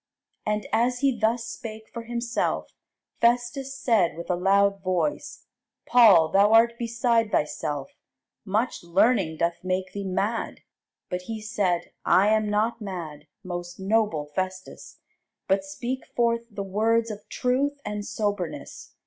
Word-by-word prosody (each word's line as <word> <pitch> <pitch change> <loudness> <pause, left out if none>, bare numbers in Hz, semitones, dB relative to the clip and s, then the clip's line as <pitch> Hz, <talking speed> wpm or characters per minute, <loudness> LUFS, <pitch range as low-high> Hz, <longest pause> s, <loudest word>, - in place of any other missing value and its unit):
And 210 0 0
as 245 +2 +2
he 275 -3 +3
thus 230 +1 0
spake 220 -1 -8
for 235 -1 -6
himself, 235 0 -2 0.5
Festus 245 +3 +1
said 215 -11 +2
with 170 - -4
a - - +2
loud 200 +2 +3
voice, 185 +11 -2 0.4
Paul, 210 -10 +6
thou 200 +4 +4
art 235 +1 +5
beside 235 -1 +1
thyself; 145 -1 -1 0.5
much 215 +5 -1
learning 180 -1 +2
doth 170 +1 -1
make 185 0 -2
thee 200 - -4
mad. 200 +4 -2 0.5
But 180 0 -3
he 225 -1 -3
said, 205 -5 -1
I 195 +3 +4
am 215 -1 +2
not 220 +3 0
mad, 165 -7 -6 0.2
most 175 -1 -6
noble 195 -6 +1
Festus; 185 +1 -5 0.5
but 195 0 +2
speak 240 +7 -5
forth 235 -1 +1
the 205 -2 -5
words 225 +4 +1
of 210 -1 -10
truth 280 +3 0
and 210 0 -3
soberness. 205 -5 -4
210 Hz, 135 wpm, -26 LUFS, 185-235 Hz, 0.5 s, Paul